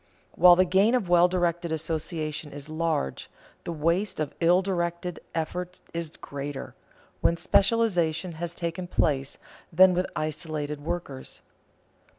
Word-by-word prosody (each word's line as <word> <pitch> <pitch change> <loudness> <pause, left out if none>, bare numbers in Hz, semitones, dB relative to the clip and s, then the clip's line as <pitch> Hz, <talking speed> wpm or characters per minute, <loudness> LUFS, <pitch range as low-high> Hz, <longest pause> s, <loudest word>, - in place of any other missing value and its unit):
While 180 0 +7
the 185 +1 +4
gain 195 +7 +3
of 210 -8 -1
well 175 0 +6
directed 175 -2 -1
association 155 -1 -3
is 145 +1 -7
large, 155 - -2 0.4
the - - -3
waste 170 +5 0
of 155 -2 -2
ill 175 +2 +4
directed 175 -2 -2 0.2
effort 180 +3 -3
is 165 -2 -5
greater, 140 0 -6 0.5
when 170 - +2
specialization 185 -3 +2
has 170 0 -4
taken 170 +1 -4
place, 140 -5 0 0.3
than 185 +2 +6
with 180 +1 0
isolated 155 -1 -3
workers. 165 -5 -5
170 Hz, 130 wpm, -27 LUFS, 155-180 Hz, 0.5 s, While